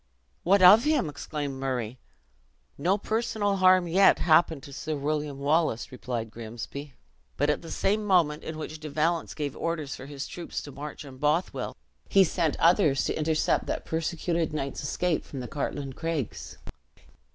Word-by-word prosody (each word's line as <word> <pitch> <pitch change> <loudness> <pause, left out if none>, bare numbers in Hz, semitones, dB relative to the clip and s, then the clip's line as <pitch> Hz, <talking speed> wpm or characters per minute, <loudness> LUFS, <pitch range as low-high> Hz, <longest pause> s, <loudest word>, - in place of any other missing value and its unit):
"What 195 +2 +4
of 205 +6 +9
him?" 300 - +2
exclaimed 145 -1 -5
Murray. 125 -3 -3 0.8
"No 180 +8 +1
personal 215 -2 -1
harm 185 -1 +5
yet 190 +4 +5
happened 160 -3 +3
to 140 -3 -10
Sir 155 +2 -3
William 145 0 -2
Wallace," 145 -3 +1
replied 120 -3 -4
Grimsby; 120 +5 -8 0.4
"but 145 +2 +3
at 150 - -2
the 165 - -10
same 210 +2 0
moment 170 -7 +2
in 160 - -6
which 155 0 -6
De 155 0 -7
Valence 160 +3 0
gave 145 -3 -3
orders 160 -4 -3
for 130 - -10
his 145 -1 -6
troops 175 - -5
to 145 - -9
march 145 +2 -8
on 135 -2 -11
Bothwell, 150 +6 -1 0.3
he 195 - +6
sent 165 -3 0
others 165 -5 +4
to - - 0
intercept 155 0 +1
that - - -3
persecuted 165 0 -1
knight's 140 -2 -3
escape 165 +3 -1
from 135 - -8
the 125 - -5
Cartlane 140 -1 -4
Craigs." 160 -5 -4
155 Hz, 165 wpm, -27 LUFS, 140-175 Hz, 0.8 s, of